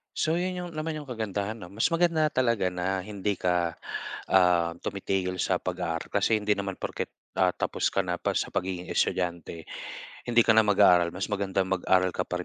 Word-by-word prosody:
So 160 +1 +1
'yon 180 +2 0
'yong 175 -1 -6
naman 155 +1 -2
'yong 145 - -10
kagandahan 110 -3 -3
'no. 90 - -10
Mas 110 +5 +1
maganda 165 -2 +2
talaga 115 -9 +1
na 90 +1 -1
hindi 100 0 -3
ka, 90 -2 +1 0.6
ah, 90 -3 +4
tumitigil 95 -2 -2
sa - - +2
pag-aaral - - -3
kasi 110 - +3
hindi 105 0 0
naman 100 -2 -1
porket, - - -4 0.3
ah, 90 -1 +3
tapos - - 0
ka 100 - 0
na 90 -1 -2
pa - - -1
sa - - -1
pagiging 90 -1 -3
estudyante, 85 -2 -1 0.7
hindi 120 0 +5
ka 115 - +6
na 110 - +7
mag-aaral. 90 -4 +5
Mas 95 +2 -3
magandang 95 -1 0
mag-aral 95 0 +2
ka - - -1
pa 90 - -1
95 Hz, 185 wpm, -27 LUFS, 90-110 Hz, 0.7 s, na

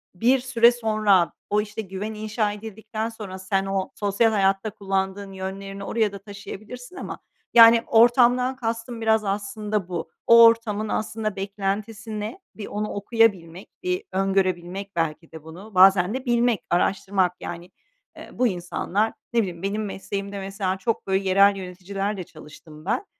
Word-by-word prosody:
bir 250 +7 +3
süre 240 -2 +4
sonra 215 -6 +2 0.2
o, 210 +1 +2
işte, 210 +1 -6
güven 200 +2 -5
inşa 215 0 -1
edildikten 220 +1 -5
sonra 200 -4 -8
sen 195 +1 -1
o 195 -1 -2
sosyal 205 +2 +2
hayatta 195 +1 +1
kullandığın 195 -1 -3
yönlerini 195 +1 -6
oraya 220 -2 0
da 200 - -8
taşıyabilirsin 215 - -10
ama, - - -7 0.3
yani, 230 0 +8
ortamdan 245 +2 +4
kastım 230 -1 -4
biraz 220 -1 +3
aslında 205 0 -2
bu. 175 -2 -4 0.2
O 230 0 +9
ortamın 220 -2 +2
aslında 215 -1 -2
beklentisi 205 +2 -4
ne? 215 - -5 0.2
Bir 210 - -7
onu 210 +1 -3
okuyabilmek, 200 -5 0
bir 365 +2 -1
öngörebilmek 190 0 -1
belki 165 0 -2
de 160 -1 -11
bunu, 185 +6 -12
bazen 190 +1 +6
de 260 +1 -4
bilmek, 240 -3 +2
araştırmak 185 +1 +1
yani. 175 +2 -7 0.5
Eee, - - -10
bu 250 - +2
insanlar, 190 +3 -1 0.2
ne 235 - +3
bileyim, 180 -2 -5
benim 210 +2 -2
mesleğimde 200 0 -5
mesela 195 -1 -3
çok, 220 +1 -2
böyle, 190 +1 +1
yerel 200 +1 +5
yöneticilerle 195 +2 -4
çalıştım 155 0 -14
ben. 315 - -1
205 Hz, 145 wpm, -24 LUFS, 190-225 Hz, 0.5 s, O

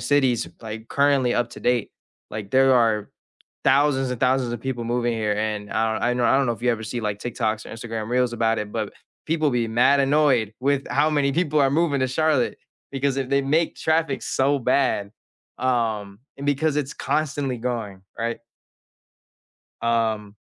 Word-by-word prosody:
cities, 135 -5 +2
like, 110 0 -7
currently, 140 -3 +2
up 120 -1 0
to - - -10
date. 120 -2 +1 0.4
Like, 105 -2 -6
there 135 0 +5
are 110 -4 +2 0.5
thousands 135 -1 +3
and 125 - -6
thousands 130 -2 +2
of 120 - -5
people 125 -3 -3
moving 120 0 0
here 110 -2 0
and 105 -1 -3
I 110 0 +1
don 110 - -3
I 125 - +2
know 125 - -1
I 130 - +4
don't 135 -1 +2
know 120 - +1
if 115 - -10
you 125 - +3
ever 110 -1 -2
see, 120 +3 -4
like, 105 -2 -2
TikToks 110 -3 -2
or - - -9
Instagram 115 -1 -5
Reels 125 0 +1
about 115 -1 +1
it, 105 0 -5
but 110 -3 -3 0.3
people 155 -2 +1
be 120 -2 0
mad 125 +5 +4
annoyed 135 -6 +2
with 140 +1 +1
how 150 +2 +2
many 140 -2 +1
people 155 -2 +1
are 135 - +4
moving 150 -2 +1
to 130 - +2
Charlotte 150 -1 +1 0.3
because 135 0 0
if 130 - -2
they 140 0 +2
make 155 +4 +1
traffic 160 -3 0
so 140 +2 +1
bad, 125 -5 +1 0.5
um, 110 -5 -1 0.2
and 140 - -5
because 145 +1 +1
it's 145 -1 -2
constantly 140 -3 -1
going, 115 -6 -4 0.2
right? 115 +1 -2 1.4
Um 110 -3 0
125 Hz, 185 wpm, -23 LUFS, 115-140 Hz, 1.4 s, there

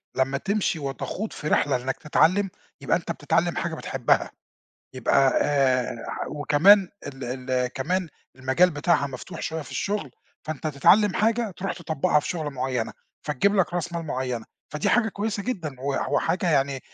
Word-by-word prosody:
لمّا 135 +1 +1
تمشي 195 -1 -1
وتخوض 145 +9 -4
في 150 - -6
رحلة 145 -3 +2
إنك 130 +2 -2
تتعلّم، 185 +6 +2 0.3
يبقى - - +2
أنت - - -5
بتتعلّم - - 0
حاجة - - -2
بتحبها، - - 0 0.6
يبقى 130 +1 +3
آآ 135 -4 +2 0.3
وكمان 170 +7 +5 0.2
ال 130 -1 -6
ال 125 -1 +2
كمان 170 +8 -2 0.3
المجال 130 +8 +3
بتاعها 145 0 +1
مفتوح 130 -2 -8
شوية 160 0 -3
في - - -11
الشغل، 195 - -2 0.4
فأنت 155 0 -3
تتعلّم 185 +8 +4
حاجة 225 0 +1
تروح 195 +1 -2
تطبّقها 160 -1 +1
في 125 - -6
شغلة 155 -4 -2
معيّنة، 130 -3 -2 0.3
فتجيب 175 +9 +2
لك 180 -2 +2
راس 175 -1 -2
مال 165 -1 -3
معيّنة، 125 -4 -3 0.3
فدي 150 - 0
حاجة 230 -2 +3
كويّسة 205 0 -3
جدًا، 170 - -3
وح 140 0 -1
وحاجة 180 -1 +1
يعني 135 -2 +1
150 Hz, 155 wpm, -25 LUFS, 135-185 Hz, 0.6 s, وكمان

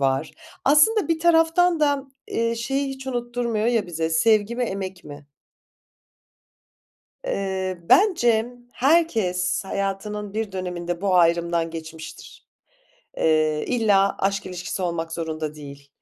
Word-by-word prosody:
var. 135 -1 0 0.3
Aslında 335 +10 +4
bir 330 -1 +1
taraftan 335 0 +3
da, 285 -2 +2 0.2
eee, 230 0 0
şeyi 270 +4 -2
hiç 265 0 -8
unutturmuyor 240 -3 -2
ya 230 -5 +1
bize 165 -1 -2
sevgi 215 +6 +2
mi, 250 - -1
emek 190 -4 -5
mi? 145 0 -11 2.0
Eee, 190 - -2
bence 240 - +4 0.3
herkes 230 - +1
hayatının 200 +1 -4
bir 220 -2 -3
döneminde 175 -2 -4
bu 195 -1 +1
ayrımdan 170 -1 +2
geçmiştir. 160 - -10 0.7
Eee, 155 -1 +2
illa 205 -5 +2
aşk 195 0 -1
ilişkisi 180 +1 -5
olmak 165 -2 -3
zorunda 160 -2 -4
değil. 140 -1 -11
195 Hz, 115 wpm, -23 LUFS, 170-245 Hz, 2.0 s, Aslında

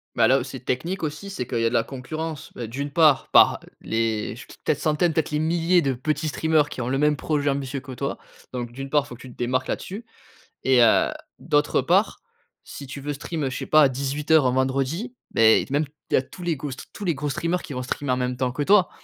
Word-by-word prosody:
Bah, - - +4
là - - +5
où - - -3
c'est - - -7
technique 170 +10 -3
aussi 160 +6 -4
c'est 125 -10 -4
qu'il 120 - -2
y 115 - +1
a 115 - +3
de - - -7
la 115 - +3
concurrence. 155 +5 -6
Beh, 120 - -6
d'une 140 +5 -4
part 150 -3 +4
par - - +6 0.2
les 110 -1 -1
ch - - -11 0.2
peut-être - - 0
centaines, 155 +2 +2
peut-être 155 -1 -1
les 150 - 0
milliers 170 +2 +2
de 135 -1 0
petits 150 +5 -2
streamers 155 -1 +2
qui 130 - -5
ont 120 - -3
le 135 +1 0
même 150 0 +3
projet 145 -1 0
ambitieux 140 0 -2
que 135 0 -9
toi. 140 +3 -4 0.3
Donc, 120 -2 -4
d'une 135 +2 -7
part 145 -2 +3
il - - -14
faut 125 - -9
que 120 - -16
tu 130 - -10
te - - -16
démarques 130 +2 -1
là - - 0
dessus 205 +5 -8 0.6
et 130 -2 +5
heu, 115 - +5 0.3
d'autre 145 -3 +2
part 185 - +2 0.4
si 140 - -9
tu 140 +2 -7
veux 145 +1 -3
stream, 150 +1 -4
heu, 130 - -1
je 130 - -5
sais - - -5
pas 155 -2 +6
18:00 140 +2 +1
un 125 - +2
vendredi 135 - -1 0.2
beh, 110 -1 +5
t 140 - -10
même 150 +2 +2 0.3
il - - -2
y - - +8
a 130 - +3
tous 180 - -13
les 170 - +1
gros 145 +1 -5
str 130 - -8
tous 205 - -8
les 170 -4 +1
gros 145 +1 -3
streamers 170 +6 -1
qui 145 - -8
vont 125 0 -3
streamer 130 +1 -2
en - - +1
même 125 0 -2
temps 125 0 0
que 145 +3 -2
toi. 195 +1 +5
140 Hz, 260 wpm, -24 LUFS, 130-155 Hz, 0.6 s, y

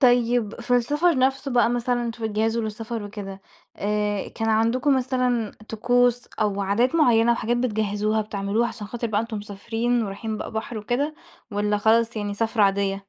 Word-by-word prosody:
طيّب 245 -3 +3
في 245 +1 +1
السفر 295 +5 +2
نفْسُه 270 +2 +1
بقى 240 -1 +3
مثلًا، 245 0 0
وأنتم 230 -1 -4
بتجهزوا 225 +2 0
للسفر 220 +1 -4
وكده، 200 -1 -7 0.4
آآ 210 -1 -1
كان 225 0 -3
عندكم 240 +5 +3
مثلًا 250 -4 0 0.2
طقُوس 245 +2 +2
أو 205 -1 +1
عادات 220 +8 +1
مُعيّنة، 235 -7 +4
وحاجات 235 +1 0
بتجهزوها 215 -2 0
بتعملوها 210 +3 -1
عشان 210 - -7
خاطر 235 +2 -4
بقى 210 -1 0
أنتم 230 -1 -4
مسافرين 225 +4 -1
ورايحين 215 +2 -4
بقى - - -5
بحر 220 +1 -4
وكده، 255 +8 -1 0.4
والّا 210 0 0
خلاص 225 +2 +3
يعني 205 -1 -2
سفرة 225 0 +1
عاديّة؟ 195 0 +1
225 Hz, 160 wpm, -24 LUFS, 210-245 Hz, 0.4 s, مُعيّنة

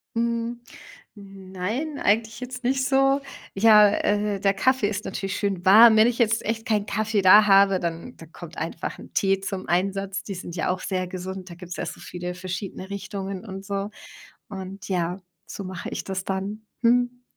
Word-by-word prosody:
Hm. 235 +1 -1 0.6
Nein, 195 +9 -5
eigentlich 220 +2 +1
jetzt 250 0 -7
nicht 260 +1 +1
so. 270 +1 +3 0.3
Ja, 210 0 +7
äh, 205 -1 0
der 195 0 +2
Kaffee 255 +2 +2
ist 210 0 -4
natürlich 195 0 -4
schön 195 -3 -2
warm. 220 +4 +8
Wenn 215 +1 +6
ich 240 - -2
jetzt 225 -2 +2
echt 225 +1 -3
keinen 210 -2 0
Kaffee 215 -1 0
da 210 +3 +8
habe, 195 -1 +5
dann 170 +8 -5
dann 165 0 -14
kommt 170 -2 -11
einfach 165 +1 -5
'n - - -12
Tee 195 -1 +1
zum 195 -1 -5
Einsatz. 195 +3 -1
Die 200 - -5
sind 175 -1 -8
ja 165 - 0
auch 185 0 -2
sehr 185 -1 -2
gesund, 185 +1 -7
da - - -8
gibt's 180 0 -9
ja - - -4
so - - -7
viele 180 0 -6
verschiedene 185 +1 -6
Richtungen 195 0 -5
und 195 -2 -8
so. 200 0 -3 0.6
Und 195 0 -8
ja, 180 -1 -1 0.3
so - - -7
mache 185 -1 -6
ich - - -5
das 190 -1 -4
dann. 195 +3 -4 0.2
Mhm. 245 +1 +2
200 Hz, 185 wpm, -24 LUFS, 185-220 Hz, 0.6 s, warm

